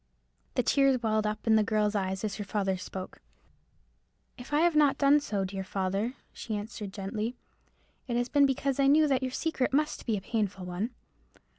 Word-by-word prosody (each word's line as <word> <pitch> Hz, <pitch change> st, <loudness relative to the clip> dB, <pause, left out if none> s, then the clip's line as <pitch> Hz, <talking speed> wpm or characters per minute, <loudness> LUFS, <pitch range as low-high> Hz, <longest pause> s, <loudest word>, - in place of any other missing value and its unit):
The 250 Hz, -, +2 dB
tears 270 Hz, -3 st, +3 dB
welled 215 Hz, -1 st, +1 dB
up 215 Hz, 0 st, -3 dB
to 225 Hz, -, +1 dB
the 220 Hz, -, +5 dB
girl's 210 Hz, -1 st, +1 dB
eyes 190 Hz, -1 st, -2 dB
as 205 Hz, -2 st, -2 dB
her 210 Hz, -, -3 dB
father 195 Hz, -1 st, -1 dB
spoke. 185 Hz, 0 st, -8 dB, 1.1 s
"If 250 Hz, +2 st, -11 dB
I 295 Hz, +1 st, +3 dB
have 345 Hz, -1 st, +3 dB
not 295 Hz, -2 st, +4 dB
done 285 Hz, +1 st, +5 dB
so, 205 Hz, -9 st, -2 dB
dear 190 Hz, 0 st, -4 dB
father," 195 Hz, +5 st, -2 dB, 0.2 s
she 220 Hz, -, -5 dB
answered, 210 Hz, -1 st, -6 dB
gently, 210 Hz, +4 st, -4 dB, 0.7 s
"it 240 Hz, -2 st, -1 dB
has 245 Hz, 0 st, 0 dB
been 285 Hz, +1 st, +4 dB
because 275 Hz, 0 st, -1 dB
I 275 Hz, -, +4 dB
knew 305 Hz, +2 st, +5 dB
your 260 Hz, -, -1 dB
secret 265 Hz, 0 st, -1 dB
must 300 Hz, +1 st, 0 dB
be 220 Hz, -3 st, +1 dB
a -, -, -5 dB
painful 200 Hz, -3 st, -2 dB
one. 180 Hz, +6 st, -3 dB
220 Hz, 185 wpm, -29 LUFS, 200-270 Hz, 1.1 s, the